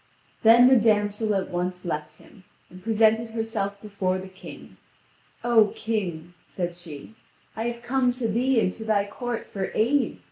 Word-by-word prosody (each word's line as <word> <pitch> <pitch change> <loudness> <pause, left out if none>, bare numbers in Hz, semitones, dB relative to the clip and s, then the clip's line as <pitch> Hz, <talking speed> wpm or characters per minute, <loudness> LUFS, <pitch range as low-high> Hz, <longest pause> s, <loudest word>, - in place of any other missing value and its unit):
Then 235 +2 +7
the 260 0 +6
damsel 210 -1 +1
at 195 - -2
once 180 +1 -3
left 155 -2 -4
him, 195 - -18 0.3
and 185 +1 -12
presented 225 +1 +3
herself 220 -3 -3
before 195 -3 -1
the 190 0 -8
King. 185 0 -12 0.7
"O 225 -3 +4
King," 175 -7 -3
said 175 -2 -4
she, 170 +1 -11 0.4
"I 225 - -3
have 235 0 -5
come 255 0 +1
to 245 -2 -2
thee 245 +3 +2
and 185 - +1
to 225 - -8
thy 210 -2 +1
court 240 +3 -5
for 195 -2 -4
aid. 260 +6 +1
215 Hz, 165 wpm, -25 LUFS, 185-230 Hz, 0.7 s, Then